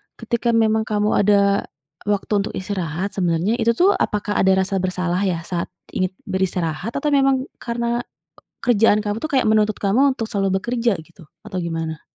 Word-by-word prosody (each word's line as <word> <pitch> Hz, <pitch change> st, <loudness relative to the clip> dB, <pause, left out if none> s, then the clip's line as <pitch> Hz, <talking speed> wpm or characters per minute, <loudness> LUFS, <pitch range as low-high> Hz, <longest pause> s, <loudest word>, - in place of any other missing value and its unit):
ketika 235 Hz, 0 st, -1 dB
memang 220 Hz, -1 st, +2 dB
kamu 210 Hz, 0 st, +1 dB
ada 200 Hz, 0 st, +3 dB, 0.4 s
waktu 205 Hz, 0 st, -1 dB
untuk 200 Hz, -, -3 dB
istirahat 185 Hz, -1 st, -3 dB
sebenarnya 180 Hz, +5 st, 0 dB
itu 230 Hz, +1 st, +3 dB
tuh 370 Hz, -, +5 dB
apakah 205 Hz, 0 st, -1 dB
ada 190 Hz, 0 st, +4 dB
rasa 195 Hz, 0 st, -1 dB
bersalah 180 Hz, -1 st, -1 dB
ya 170 Hz, -3 st, 0 dB
saat 170 Hz, -1 st, -3 dB, 0.2 s
ingin 185 Hz, 0 st, -1 dB, 0.2 s
beristirahat 185 Hz, +2 st, -2 dB
atau 295 Hz, +1 st, 0 dB
memang 270 Hz, -1 st, +3 dB
karena 235 Hz, 0 st, -2 dB, 0.6 s
kerjaan 225 Hz, -3 st, +4 dB
kamu 205 Hz, 0 st, -2 dB
tuh 310 Hz, -, -3 dB
kayak 265 Hz, -2 st, +2 dB
menuntut 215 Hz, -1 st, +2 dB
kamu 260 Hz, +8 st, +3 dB
untuk 225 Hz, -, -2 dB
selalu 195 Hz, -2 st, +1 dB
bekerja 235 Hz, -1 st, 0 dB
gitu? 170 Hz, +1 st, -17 dB, 0.2 s
Atau 190 Hz, -4 st, -4 dB
gimana? 165 Hz, -2 st, -4 dB
205 Hz, 165 wpm, -21 LUFS, 185-230 Hz, 0.6 s, tuh